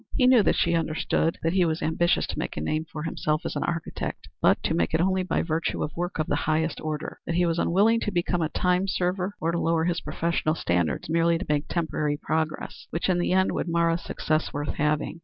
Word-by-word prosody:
He 255 - +4
knew 250 -2 +7
that - - +2
she 170 - +2
understood 165 0 0
that 165 +1 +1
he 185 -1 +4
was 160 -2 -1
ambitious 170 +2 +2
to - - -5
make - - -4
a - - 0
name 155 - -1
for 150 -1 -5
himself 155 -1 -1
as - - -3
an - - -1
architect; 165 -2 -4
but - - +5
to - - 0
make 85 - +1
it - - +2
only 185 +2 +2
by 185 - 0
virtue 165 0 -1
of 150 - -5
work 175 +1 -3
of 155 - -1
a - - +3
high 155 +1 +1
order; 155 0 -4
that 170 - -1
he 175 +1 +3
was 165 0 0
unwilling 215 +6 +3
to 210 - -2
become 175 -1 0
a 160 - 0
time 180 +3 +1
server 185 +1 -1
or 165 +1 0
to 170 - -1
lower 165 -1 +1
his 175 0 0
professional 165 -2 -1
standards 85 - 0
merely 165 +1 +2
to - - -5
make 150 0 0
temporary 150 -3 -1
progress, 160 +2 -3
which 165 - -2
in 180 -1 +2
the 175 - 0
end 190 +1 +3
would - - -2
mar 170 0 +2
a 165 - +1
success 155 -2 -1
worth 145 +1 -3
having. 150 +2 -1
165 Hz, 240 wpm, -26 LUFS, 155-175 Hz, -, knew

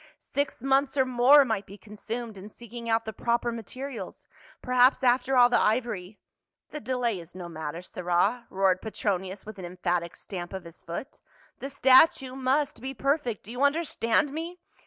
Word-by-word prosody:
" - - -31
Six 285 -4 -3
months 270 +1 +2
or 265 - +4
more 255 +3 +6
might 220 -4 -2
be 200 - -11
consumed 220 +2 -7
in 195 +2 -10
seeking 235 +1 -9
out 225 0 +2
the 220 - -5
proper 235 +2 0
materials; 245 +3 -7 0.3
perhaps 255 +2 +3
after 255 +1 +3
all 245 -1 +8
the 245 - +3
ivory 215 -4 -1 0.2
— - - -60
" - - -64
"The 300 - -5
delay 240 -4 -1
is 170 +1 -13
no 180 -2 -7
matter, 160 +1 -6
sirrah," 185 +7 0
roared 190 -1 +2
Petronius 190 -3 -3
with 215 -2 -9
an 185 - -6
emphatic 175 -1 -2
stamp 175 -2 -7
of 190 -1 -5
his 170 -1 -13
foot. 200 - -7 0.2
" - - -31
The 275 - -5
statue 265 -1 +5
must 270 +2 0
be 265 +1 -5
perfect. 275 -4 -1
Do 220 - -10
you 245 +2 -5
understand 285 -3 +1
me?" 335 +3 -5
235 Hz, 185 wpm, -27 LUFS, 195-265 Hz, 0.3 s, all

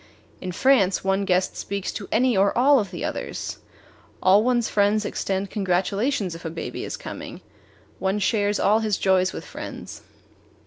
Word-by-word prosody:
In 185 - -4
France 200 -2 +3
one 195 +1 +1
guest 185 -1 +1
speaks 200 -1 -3
to 200 - -6
any 245 +1 +3
or 195 +3 +2
all 275 +3 +6
of 200 -3 -2
the - - -5
others; - - -4 0.6
all 195 +3 +5
one's 240 -1 +2
friends 205 +1 +2
extend 195 0 -2
congratulations 195 - 0
if 165 - -9
a 165 - -3
baby 165 +1 -5
is - - -5
coming; - - -8 0.6
one 190 +2 0
shares 205 0 +1
all 215 +2 +4
his 215 -3 0
joys 190 -1 +2
with - - -7
friends. - - -8
200 Hz, 165 wpm, -24 LUFS, 190-220 Hz, 0.6 s, all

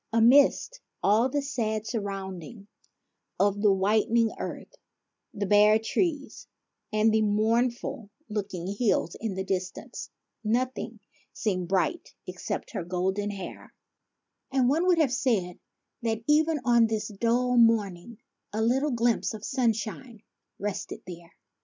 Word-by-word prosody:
Amidst 275 - +4 0.2
all 220 +6 +4
the 285 +2 -1
sad 220 -6 -2
surrounding 200 -1 -5 0.7
of 205 0 +2
the 210 - +5
whitened 215 +4 +2
earth, - - -6 0.6
the 200 - -3
bare 210 +2 +6
trees, 290 - -2 0.4
and 215 +1 +3
the 220 - +3
mournful 230 +3 0 0.2
looking 200 -5 -4
hills 200 -4 0
in 220 -4 -3
the 190 - -2
distance, 185 -1 -4 0.3
nothing 235 0 -2 0.3
seemed 185 -5 -2
bright 190 - -1
except - - -5
her - - -3
golden 190 +4 -1
hair; 195 -3 -8 0.8
and 260 -2 +2
one 320 +7 +2
would 360 -2 +4
have 295 -6 +2
said 205 -10 0 0.4
that 225 -1 -2
even 310 +2 +3
on 235 -2 +5
this 220 -1 -2
dull 235 +4 +1
morning 225 -3 +2 0.3
a 220 +1 -1
little 265 +6 +2
glimpse 235 -2 +1
of 215 0 -8
sunshine 230 -2 -2 0.3
rested 205 -1 -5
there. 170 -2 -11
220 Hz, 125 wpm, -27 LUFS, 200-245 Hz, 0.8 s, bare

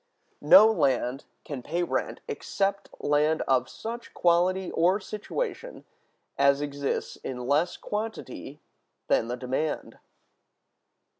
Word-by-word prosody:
No 275 -6 +9
Land 135 - +1 0.2
can 140 -4 -5
pay 170 +7 -2
Rent - - -2
except 200 0 -2
Land 150 +2 +2
of 130 -1 +1
such 235 +1 -7
Quality 180 +2 +2
or 180 +5 +3
Situation - - -5 0.5
as 140 0 +5
exists 145 -1 -3
in 125 -2 -6
less 150 +6 +1
Quantity 210 -9 -5 0.5
than 115 - +3
the 125 +1 -3
Demand. 130 +5 -3
155 Hz, 105 wpm, -27 LUFS, 140-200 Hz, 0.5 s, No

